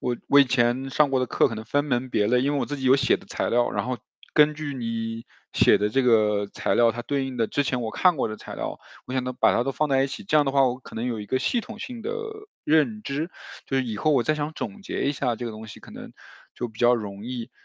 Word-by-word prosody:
我 125 -1 -1
我 145 - +6
以 - - +7
前 125 +1 +1
上 145 +1 +3
过 135 - +2
的 130 - 0
课 - - +2
可 115 - -5
能 110 0 -7
分 145 +5 0
门 130 -2 -1
别 105 - +2
类 125 +1 +3
因 140 +2 +1
为 145 - 0
我 - - -1
自 145 - -4
己 135 - -6
有 130 - +6
写 135 -1 +3
的 - - -17
材 - - -2
料， 120 0 +2
然 - - -2
后 125 -1 -2 0.4
根 150 0 +5
据 150 -1 -5
你 115 -2 -4 0.3
写 - - +5
的 105 - +1
这 135 +6 +1
个 105 -4 +3
材 - - -1
料， 115 -1 +5
它 120 +2 -5
对 140 +1 -1
应 130 -1 -6
的 115 -2 +1
之 145 - +1
前 125 -2 -1
我 110 - -3
看 180 +5 +3
过 130 - 0
的 110 - -6
材 - - -9
料， - - -4 0.3
我 130 - -7
想 130 -1 0
都 125 - -3
把 - - +3
它 120 - +2
都 135 - -1
放 150 +4 0
在 135 -1 +3
一 - - 0
起， 135 - -7
这 155 - +2
样 150 - +5
的 135 - 0
话 135 -1 +5
我 125 0 -1
可 - - -13
能 115 +2 -2
有 115 -3 -2
一 105 - -7
个 130 - 0
系 240 - +1
统 225 -1 -10
性 240 -2 -7
的 - - -3 0.5
认 160 +8 +2
知。 155 +1 -3 0.4
就 135 - -1
是 130 - +1
以 110 -3 -4
后 155 +9 +1
我 130 - +3
再 155 +5 +1
想 150 +1 -3
总 205 +5 -6
结 - - -3
一 140 - +1
下 125 -4 -1
这 120 - -6
个 - - -4
东 110 +1 -9
西 105 - -11
可 - - -14
能 - - -10 0.4
就 120 - -4
比 110 0 -17
较 120 +1 +5
容 105 -3 -6
易。 120 0 -5
130 Hz, 325 characters per minute, -25 LUFS, 115-145 Hz, 0.5 s, 以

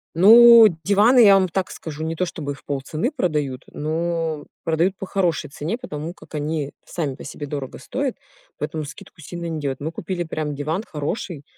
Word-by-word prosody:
Ну, 230 +5 +9 0.2
диваны, 210 +7 +5
я 210 -4 +8
вам 190 -1 +3
так 185 +1 -2
скажу, 155 -1 -7
не 160 +1 -2
то, 180 - 0
чтобы 150 -4 -5
в 140 - -16
полцены 145 - -2
продают, 150 - -2
но 160 0 -2 0.2
продают 170 +4 +1
по - - -5
хорошей 185 -7 -1
цене, 155 - -4
потому 155 -7 -6
как - - -17
они 150 -1 -2
сами 150 -6 -3
по - - -11
себе 145 0 -7
дорого 140 -2 -5
стоят, 270 -1 -3 0.4
поэтому 155 +1 -3
скидку 150 +2 -11
сильно 170 +3 -7
не 160 -2 -3
делают. 140 -3 -3
Мы 155 +3 -4
купили 175 +1 -4
прям 155 -3 -4
диван 155 +8 -2
хороший, 150 +1 -4
160 Hz, 180 wpm, -22 LUFS, 150-185 Hz, 0.4 s, Ну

